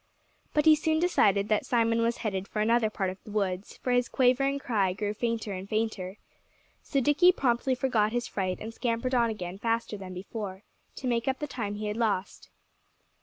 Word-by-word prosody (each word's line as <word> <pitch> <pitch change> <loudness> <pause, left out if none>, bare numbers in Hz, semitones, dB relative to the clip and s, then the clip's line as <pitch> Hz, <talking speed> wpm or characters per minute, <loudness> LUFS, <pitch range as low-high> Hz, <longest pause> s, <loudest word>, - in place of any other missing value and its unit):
But 300 - +3
he 310 -1 +8
soon 315 +1 +1
decided 205 - +3
that 215 - +2
Simon 230 -1 +2
was 230 +1 +1
headed 195 -2 -2
for 215 - -4
another 225 +1 +3
part 195 -3 -2
of 185 - -13
the - - -12
woods, 195 -2 -2
for 250 - -2
his 245 0 +2
quavering 270 +2 +2
cry 205 -9 0
grew 205 +1 -2
fainter 225 -2 -2
and 190 +1 -7
fainter. 215 -3 -2 0.6
So 275 - 0
Dickie 295 +7 +5
promptly 255 -4 +1
forgot 230 -5 +1
his 240 0 -1
fright 185 -2 -2
and 225 +1 -7
scampered 240 +2 -1
on 235 -2 +3
again 185 -3 -5
faster 230 -1 -1
than 185 -2 -8
before, 195 +1 -6 0.3
to 260 - -5
make 235 0 0
up 265 0 +1
the 295 - -3
time 220 -8 -4
he 210 +1 -5
had 210 +1 -2
lost. 210 -5 -1
225 Hz, 195 wpm, -28 LUFS, 200-250 Hz, 0.6 s, he